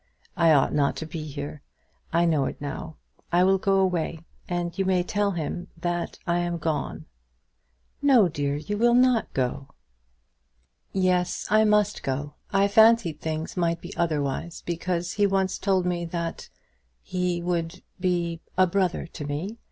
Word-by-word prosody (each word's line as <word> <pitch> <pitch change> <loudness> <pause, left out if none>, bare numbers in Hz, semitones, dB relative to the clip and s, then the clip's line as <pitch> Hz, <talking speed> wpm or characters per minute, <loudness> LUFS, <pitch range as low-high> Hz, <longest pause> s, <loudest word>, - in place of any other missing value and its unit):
I 165 -1 +4
ought 145 -3 +4
not 145 -2 +2
to 160 - -5
be 155 -1 -6
here. 145 0 -6 0.5
I 170 +1 +3
know 155 -5 +2
it - - -5
now. 145 +2 -6 0.4
I 175 +1 +4
will 190 +1 +4
go 195 +1 +2
away, 175 -4 0 0.3
and 175 -1 -2
you 195 - 0
may 185 -1 +2
tell 205 +2 0
him 175 +2 -4
that 175 +1 -2
I 175 0 +1
am 175 0 -1
gone." 160 -1 -3 1.0
"No, 260 -9 +6
dear; 145 -3 -2
you 205 +8 -4
will 240 +1 +4
not 250 -2 +3
go." 130 +1 -1 1.2
"Yes; 180 -2 +1
I 215 0 +5
must 210 -1 +2
go. 145 +2 -3 0.2
I 195 0 +4
fancied 220 -7 +4
things 160 0 -3
might 170 -2 0
be 175 +3 -9
otherwise, 155 0 -2
because 175 0 -2
he 205 -1 +3
once 195 -1 0
told 190 -2 +1
me 175 -1 -1
that 170 0 -4 0.5
he 180 -1 -1
would 170 -1 -2 0.2
be 175 -2 -1 0.2
a 185 - +6
brother 185 -2 0
to 160 -2 -8
me. 180 +11 -4
175 Hz, 160 wpm, -26 LUFS, 160-190 Hz, 1.2 s, No